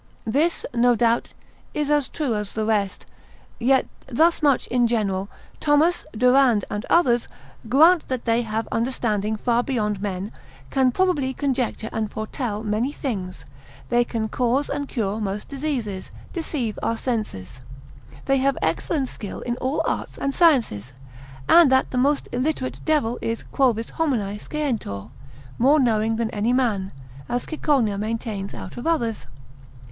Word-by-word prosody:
This, 295 +10 +1
no 245 0 +4
doubt, 235 0 +2 0.5
is 295 -1 0
as 295 -3 +2
true 290 -7 -1
as 210 -1 -3
the 220 -1 -1
rest; 205 -3 0 0.5
yet 260 +2 +3 0.2
thus 325 +8 +3
much 285 -4 +3
in 245 -1 +2
general. 200 -4 -1 0.3
Thomas, 310 +4 +3
Durand, 250 -2 +4
and 205 +1 -4
others, 245 -9 +3 0.4
grant 320 +7 +5
that 255 -2 -3
they 230 0 +2
have 225 -1 -3
understanding 220 -3 0
far 235 +2 +1
beyond 210 -6 -1
men, 200 0 -3 0.4
can 265 -2 +3
probably 290 -5 +1
conjecture 255 -5 -1
and 220 -1 -1
foretell 215 0 -4
many 220 +5 -1
things; 195 -11 -5 0.4
they 240 0 +4
can 230 -2 -3
cause 250 +5 0
and 285 -1 -2
cure 215 -3 -1
most 205 0 -3
diseases, 260 -9 -3 0.2
deceive 290 - -3
our 230 - 0
senses; 130 - -4 0.6
they 275 0 +3
have 270 +1 +1
excellent 265 - 0
skill 205 -5 -7
in 240 -1 -2
all 265 +4 -1
Arts - - -3
and 275 - -1
Sciences; 230 - +2 0.5
and 335 -5 +7
that 260 0 +3
the 255 - -2
most 280 +3 +2
illiterate 260 +1 -2
devil 290 -7 +1
is 230 0 -2
Quovis 235 -5 +1
homine 235 -11 -1
scientior 235 - -3 0.5
(more 280 +6 +5
knowing 225 -3 +2
than 225 -1 -1
any 220 +4 0
man), 215 -7 +1 0.4
as 245 0 -1
Cicogna 265 -10 +1
maintains 215 -2 -3
out - - -8
of 240 - -4
others. 235 - 0
240 Hz, 145 wpm, -23 LUFS, 215-275 Hz, 0.6 s, and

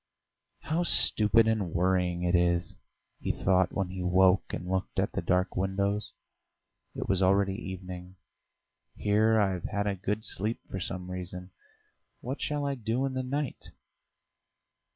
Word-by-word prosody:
"How 160 +2 -1
stupid 110 -9 +4
and 105 -6 0
worrying 90 -1 +1
it 90 0 +1
is!" 85 -1 +2 0.4
he - - -1
thought 95 -1 +2
when 95 -3 -2
he 95 0 -5
woke 90 +1 +4
and 90 - -5
looked 95 0 -2
at - - +1
the - - -2
dark 90 0 +1
windows: 100 +2 -1 0.8
it - - -4
was 95 -1 +1
already 95 +1 +3
evening. 95 -3 -7 0.8
"Here 110 +2 +3
I've 95 -4 0
had 100 -1 -1
a 100 - +1
good 100 +3 -3
sleep 110 +4 -2
for 95 - -5
some 90 0 -5
reason. 90 0 -6 0.7
What 130 +4 -5
shall 145 -1 -1
I 140 - 0
do 120 +1 -1
in 135 - -2
the 130 - -1
night?" 140 +2 -3
95 Hz, 150 wpm, -29 LUFS, 90-110 Hz, 0.8 s, stupid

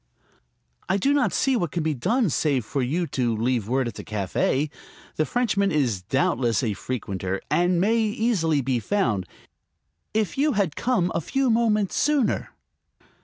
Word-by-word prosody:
"I 190 - +3
do 275 +9 +2
not 285 - +2
see 270 -1 +1
what 175 -9 0
can 170 +2 -2
be 155 0 0
done 210 - +1
save 135 -5 +1
for 140 +4 -2
you 155 +8 0
to 120 -7 -1
leave 115 -2 0
word 130 +1 +1
at 120 - -5
the - - -8
café. 110 +8 -1 0.4
The 155 - 0
Frenchman 200 - +1
is 125 - 0
doubtless 120 +1 +1
a 110 -4 0
frequenter, 95 -5 -4
and 175 0 +2
may 220 +5 +2
easily 210 - +1
be 130 -1 0
found. 115 - 0 0.8
If 220 +5 -1
you 295 0 +3
had 195 -8 0
come 230 -8 +1
a 165 - 0
few 265 - 0
moments 215 -3 +1
sooner...." 290 -6 +1
160 Hz, 165 wpm, -24 LUFS, -, 0.8 s, I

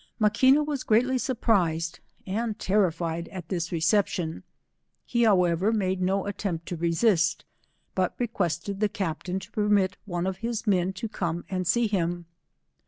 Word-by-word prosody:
Maquina 260 +7 +4
was 290 -3 -2
greatly 250 +4 +3
surprised 180 -11 0 0.3
and 215 +2 -2
terrified 170 -5 0
at 180 -4 -8
this 175 -2 -2
reception; 170 - +1 0.6
he 235 - 0
howe* 180 -5 +4
ver, 195 +6 +1
made 190 -4 0
no 190 +1 +1
attempt 190 -4 -3
to 175 - -4
resist, 170 +1 +2 0.5
but - - 0
requested 200 - -2
the 210 -1 +2
captain 180 -1 -3
to 190 +4 -12
permit 205 -3 +2
one 175 -3 -2
of 190 -1 -2
his 230 +1 -3
men 185 -3 +2
to 190 +4 -4
come 170 -5 -3
and 185 -2 -1
see 235 +7 +3
him. 175 -4 -1
190 Hz, 150 wpm, -27 LUFS, 170-215 Hz, 0.6 s, Maquina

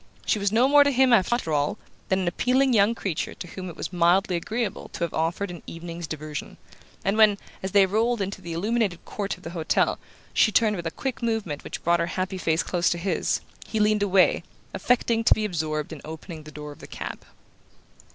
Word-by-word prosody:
She 215 - +1
was 200 0 +1
no 235 +4 +4
more 290 +1 +7
to 285 - +2
him, 260 -2 +4
after 205 -5 +2
all, 145 +8 +1 0.3
than 190 - +3
an 180 - -2
appealing 255 +8 +2
young 215 +1 +4
creature 190 -8 -3
to 175 - -8
whom 185 0 -6
it 165 - -9
was - - -5
mildly 180 +2 +3
agreeable 215 +4 -3
to - - -3
have 170 - -2
offered 170 +4 -1
an 175 - -9
evening's 170 0 -7
diversion; 155 -1 -6 0.5
and 195 +2 +1
when, 215 -2 +6 0.2
as 190 - -3
they 195 0 +5
rolled 225 +4 +1
into 195 0 -3
the 170 -2 -6
illuminated 205 0 -1
court 200 -3 -4
of 180 - -19
the 165 - -6
hotel, 165 -3 +1 0.3
she 215 - +4
turned 215 -1 +3
with 170 -3 -4
a - - 0
quick 250 +6 -4
movement 225 -10 -2
which - - -7
brought 170 0 +3
her 170 - 0
happy 185 +1 -3
face 160 -1 +1
close 175 -2 +1
to 175 - 0
his, 185 +3 0 0.3
he 220 - -2
leaned 210 0 +3
away, 195 -2 +4 0.3
affecting 235 -2 +1
to - - +6
be 215 - -1
absorbed 155 -5 -2
in 150 - -9
opening 160 0 -8
the 155 - -10
door 150 -1 -8
of 145 - -13
the - - -11
cab. - - -7
190 Hz, 215 wpm, -25 LUFS, 170-220 Hz, 0.5 s, more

